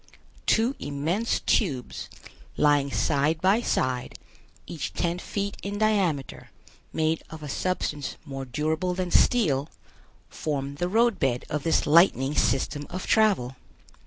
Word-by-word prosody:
Two 230 Hz, +5 st, +3 dB
immense 160 Hz, +11 st, -1 dB
tubes, 140 Hz, -, -1 dB, 0.5 s
lying 145 Hz, -2 st, +3 dB
side 150 Hz, +3 st, +1 dB
by 195 Hz, +6 st, +3 dB
side, 130 Hz, -, -1 dB, 0.5 s
each 165 Hz, -5 st, -5 dB
ten 175 Hz, 0 st, -1 dB
feet 200 Hz, +2 st, -3 dB
in 200 Hz, +1 st, -4 dB
diameter, 195 Hz, -10 st, 0 dB, 0.4 s
made 160 Hz, 0 st, 0 dB
of 160 Hz, -1 st, -9 dB
a -, -, -5 dB
substance 150 Hz, -2 st, -2 dB
more 135 Hz, -2 st, -5 dB
durable 160 Hz, +7 st, -1 dB
than 180 Hz, -1 st, -3 dB
steel, 155 Hz, -, +3 dB, 0.6 s
form 140 Hz, -2 st, -3 dB
the 175 Hz, +3 st, -1 dB
road 230 Hz, 0 st, +2 dB
bed 125 Hz, -2 st, 0 dB
of 150 Hz, -, -1 dB
this 165 Hz, +2 st, +1 dB
lightning 150 Hz, -4 st, +4 dB
system 145 Hz, +2 st, 0 dB
of 185 Hz, +1 st, -5 dB
travel. 195 Hz, -, +2 dB
160 Hz, 130 wpm, -26 LUFS, 140-190 Hz, 0.6 s, lightning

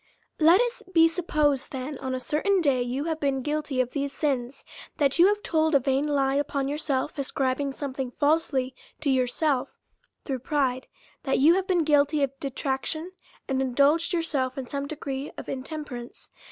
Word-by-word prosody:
Let 330 Hz, +4 st, +6 dB
it 470 Hz, -6 st, -4 dB
be 330 Hz, 0 st, +7 dB
supposed, 305 Hz, -5 st, 0 dB
that 265 Hz, +2 st, -5 dB
on 260 Hz, -1 st, -3 dB
a -, -, -3 dB
certain 320 Hz, +8 st, +1 dB
day 275 Hz, -7 st, +2 dB
you 250 Hz, +3 st, -2 dB
have 320 Hz, 0 st, -2 dB
been 270 Hz, -2 st, 0 dB
guilty 295 Hz, -2 st, -2 dB
of 250 Hz, -1 st, +1 dB
these 280 Hz, -1 st, -2 dB
sins: 270 Hz, -3 st, -2 dB, 0.3 s
that 280 Hz, +1 st, +2 dB
you 350 Hz, -, +8 dB
have 415 Hz, 0 st, 0 dB
told 315 Hz, -1 st, +2 dB
a -, -, +7 dB
vain 270 Hz, +2 st, 0 dB
lie 275 Hz, -2 st, +1 dB
upon 280 Hz, -1 st, -1 dB
yourself, 290 Hz, -1 st, -1 dB
ascribing 275 Hz, 0 st, -1 dB
something 265 Hz, -2 st, -4 dB
falsely 275 Hz, -1 st, +1 dB, 0.3 s
to 290 Hz, -3 st, +1 dB
yourself 260 Hz, +2 st, 0 dB, 0.5 s
through 265 Hz, -3 st, -2 dB
pride; 260 Hz, -1 st, -1 dB, 0.3 s
that 270 Hz, -, 0 dB
you 305 Hz, +5 st, +6 dB
have 380 Hz, +1 st, 0 dB
been 360 Hz, -4 st, +2 dB
guilty 290 Hz, -1 st, +3 dB
of 275 Hz, -, +1 dB
detrac 270 Hz, -1 st, -2 dB
tion, 325 Hz, +3 st, -4 dB, 0.4 s
and 265 Hz, -1 st, 0 dB
indulged 280 Hz, +6 st, +2 dB
yourself 290 Hz, -7 st, 0 dB
in 265 Hz, -, -4 dB
some 280 Hz, +2 st, -4 dB
degree 280 Hz, -2 st, -5 dB
of -, -, -7 dB
intem 295 Hz, +3 st, -5 dB
perance. 240 Hz, -3 st, -9 dB
280 Hz, 180 wpm, -26 LUFS, 265-315 Hz, 0.5 s, you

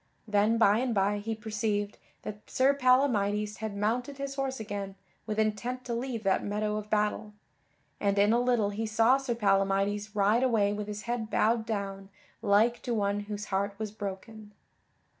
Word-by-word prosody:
Then 210 Hz, +2 st, +3 dB
by 215 Hz, -1 st, +4 dB
and 250 Hz, -2 st, -1 dB
by 200 Hz, +1 st, +2 dB
he 225 Hz, +2 st, -3 dB
perceived 210 Hz, -2 st, -2 dB, 0.2 s
that 210 Hz, 0 st, -8 dB
Sir 265 Hz, +2 st, +3 dB
Palamydes 215 Hz, -6 st, +2 dB
had 215 Hz, -2 st, -5 dB
mounted 245 Hz, +7 st, -1 dB
his 275 Hz, 0 st, -4 dB
horse 270 Hz, -2 st, -3 dB
again 200 Hz, -2 st, -5 dB, 0.3 s
with 215 Hz, -1 st, -3 dB
intent 220 Hz, +4 st, -1 dB
to 240 Hz, -, -3 dB
leave 235 Hz, -1 st, -3 dB
that 195 Hz, -1 st, +2 dB
meadow 210 Hz, +1 st, -1 dB
of 210 Hz, 0 st, -6 dB
battle, 210 Hz, 0 st, 0 dB, 0.7 s
and 200 Hz, -1 st, +1 dB
in 205 Hz, +2 st, +4 dB
a 235 Hz, -, +3 dB
little 240 Hz, -5 st, +2 dB
he 220 Hz, +2 st, -3 dB
saw 225 Hz, +4 st, +4 dB
Sir 265 Hz, -3 st, -2 dB
Palamydes 200 Hz, 0 st, +1 dB
ride 210 Hz, +3 st, +3 dB
away 220 Hz, -6 st, +2 dB
with 210 Hz, 0 st, -4 dB
his 210 Hz, 0 st, -6 dB
head 235 Hz, -2 st, -3 dB
bowed 225 Hz, 0 st, +1 dB
down 195 Hz, -3 st, -4 dB, 0.3 s
like 225 Hz, +3 st, +3 dB
to 240 Hz, -, -2 dB
one 200 Hz, -1 st, 0 dB
whose 205 Hz, 0 st, -5 dB
heart 200 Hz, +1 st, 0 dB
was 215 Hz, -1 st, -4 dB
broken. 210 Hz, +1 st, -7 dB
215 Hz, 175 wpm, -29 LUFS, 205-230 Hz, 0.7 s, by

